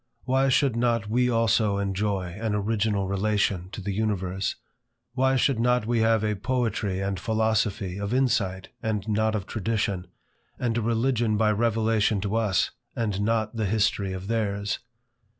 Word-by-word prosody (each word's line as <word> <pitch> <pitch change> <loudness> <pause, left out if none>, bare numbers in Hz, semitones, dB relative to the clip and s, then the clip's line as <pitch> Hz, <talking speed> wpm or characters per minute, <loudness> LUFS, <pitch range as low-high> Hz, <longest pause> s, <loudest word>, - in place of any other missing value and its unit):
Why 135 +1 +2
should 130 -2 +3
not 115 -3 +1
we 125 +2 +3
also 110 -3 +2
enjoy 100 -1 -1
an 110 -2 0
original 105 -1 0
relation 100 -2 0
to 105 - -7
the 100 +1 -3
universe? 95 -3 -1 0.6
Why 130 +1 +2
should 130 -2 +2
not 125 -1 +2
we 120 0 +1
have 110 -1 +3
a 105 0 0
poetry 110 -4 -1
and 95 -1 -2
philosophy 110 -4 0
of 100 +1 -3
insight 105 -8 0
and 110 -2 -2
not 110 +1 +1
of 100 -3 -3
tradition, 100 -4 -2 0.5
and 120 -2 -1
a 120 - +1
religion 115 -1 +1
by 110 0 +3
revelation 110 -1 +1
to 100 +2 -2
us, 105 -5 +1 0.2
and 105 -4 -1
not 110 +1 0
the 110 -2 0
history 105 -1 +1
of 95 0 -5
theirs? 105 -1 -1
110 Hz, 155 wpm, -26 LUFS, 100-115 Hz, 0.6 s, should